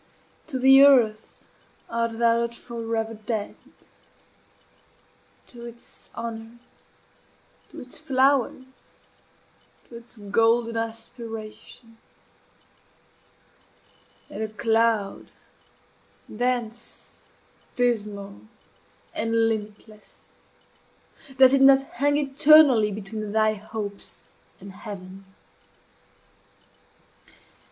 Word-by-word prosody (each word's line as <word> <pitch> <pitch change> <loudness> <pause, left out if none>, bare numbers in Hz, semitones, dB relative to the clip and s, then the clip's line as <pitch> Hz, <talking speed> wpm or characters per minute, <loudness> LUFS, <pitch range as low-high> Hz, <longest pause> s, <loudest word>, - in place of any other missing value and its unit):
to 280 -4 -3
the 270 +1 +7
earth 235 -6 +3 0.4
art 230 -1 -2
thou 230 0 +3
not 235 0 -3
forever 230 -2 -4
dead? 215 -1 -4 1.9
to 235 -1 -13
its 235 0 -11
honors, 230 +1 -9 0.8
to - - -11
its 250 - -4
flowers, 265 -1 +1 1.2
to 235 - -13
its 235 0 -11
golden 225 +3 +1
aspirations? 225 0 -7 2.3
and - - -8
a 220 - -1
cloud, 225 -2 0 1.1
dense, 240 -1 -4 0.5
dismal, 210 -5 -2 0.7
and 225 0 +1
limitless, 215 0 -8 1.1
does 260 0 +7
it 275 - +4
not 270 0 +7 0.2
hang 290 0 +3
eternally 280 -5 +5
between 210 +1 -6
thy 215 0 +3
hopes 210 -1 -7 0.3
and 195 0 -11
heaven? 195 -1 -10
230 Hz, 75 wpm, -24 LUFS, 215-245 Hz, 2.3 s, the